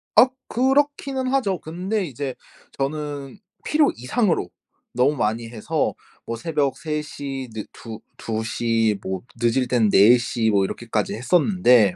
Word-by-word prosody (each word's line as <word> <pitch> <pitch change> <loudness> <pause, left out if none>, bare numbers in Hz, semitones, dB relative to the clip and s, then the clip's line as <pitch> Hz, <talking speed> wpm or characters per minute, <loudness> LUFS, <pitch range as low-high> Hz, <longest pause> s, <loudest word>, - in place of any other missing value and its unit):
악. 255 +1 +7
그렇기는 270 +1 +1
하죠. 245 -9 +1
근데 185 +6 -2
이제 135 -3 -4 0.4
저는 145 +3 -4 0.2
필요 300 -1 +3
이상으로 145 - 0 0.4
너무 130 +5 +3
많이 115 -1 -1
해서 110 -3 -1 0.3
뭐 115 - -3
새벽 145 0 -1
3 150 0 -2
시 135 -3 -6
느 110 -2 -4
2- 115 -2 -9 0.2
2 110 -1 -3
시 115 -3 +1
뭐 95 -1 -4 0.2
늦을 120 +2 +2
땐 120 -4 +3
4 110 +6 +7
시 120 -2 0
뭐 100 -2 +3
이렇게까지 110 0 -2
했었는데 125 - +4
130 Hz, 230 characters per minute, -23 LUFS, 115-180 Hz, 0.4 s, 악